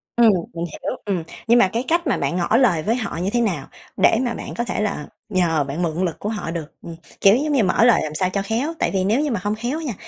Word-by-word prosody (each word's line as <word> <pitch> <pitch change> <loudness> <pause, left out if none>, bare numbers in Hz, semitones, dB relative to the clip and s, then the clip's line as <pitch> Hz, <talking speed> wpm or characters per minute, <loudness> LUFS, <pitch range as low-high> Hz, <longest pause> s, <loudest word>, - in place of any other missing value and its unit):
Ừm, 235 -2 +6 0.2
mình 170 0 -3
hiểu, - - -4
ừm, 190 -5 -1 0.2
nhưng 235 +1 +6
mà 215 - +5
cái 235 +2 0
cách 340 0 +1
mà 255 - +1
bạn - - -1
ngỏ 180 +6 +2
lời 200 -12 +3
với 225 +6 +1
họ 220 -8 -4
như 180 +3 -1
thế 240 - +2
nào 180 -12 -1 0.3
để - - +4
mà 245 -2 -1
bạn - - -7
có 235 - 0
thể 235 - -2
là 200 -8 -2 0.2
nhờ, 170 -6 +2
bạn 140 +5 -4
mượn 170 +2 0
lực 170 - -4
của 210 - -3
họ 210 -6 -4
được? 165 -2 -4 0.2
Ừm, 170 - -8 0.3
kiểu, 195 +1 +7
giống 295 +4 0
như, 260 -6 +3
mở 190 +3 +3
lời 245 - +5
làm 155 0 -5
sao 185 +3 +1
cho 200 +2 -1
khéo, 230 +10 -2
tại - - +1
vì 190 -1 +1
nếu 215 +7 +2
như 300 -2 -1
mà 225 - -1
hông 205 +1 0
khéo 240 +8 -3
á - - -6
nha, 255 - -2
205 Hz, 290 wpm, -21 LUFS, 175-240 Hz, 0.3 s, kiểu